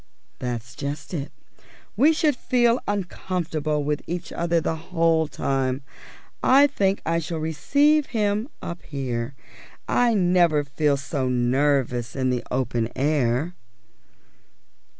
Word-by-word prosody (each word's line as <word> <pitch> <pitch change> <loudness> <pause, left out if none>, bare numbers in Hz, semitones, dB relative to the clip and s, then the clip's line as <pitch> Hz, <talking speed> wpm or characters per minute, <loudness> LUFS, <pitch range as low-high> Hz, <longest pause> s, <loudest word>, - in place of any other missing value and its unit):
"That's 120 -1 -4
just 140 +6 -5
it. 145 -4 -4 0.6
We 300 +3 +5
should 310 -3 +2
feel 240 -1 +2
uncomfortable 170 -6 -2
with 150 0 -1
each 175 0 -4
other 170 0 +1
the 160 0 -1
whole 165 0 +1
time. 135 -1 -1 0.6
I 275 +2 +6
think 200 -8 0
I 165 +1 +1
shall 165 0 -4
receive 285 - +2
him 215 +1 0
up 170 0 -5
here; 130 -3 -4 0.5
I 240 -2 +3
never 175 -5 +3
feel 140 0 +1
so 135 -1 -2
nervous 125 -1 +1
in 130 -1 +1
the 125 -1 -1
open 120 -3 -1
air." 140 +2 +1
155 Hz, 120 wpm, -24 LUFS, 135-185 Hz, 0.6 s, I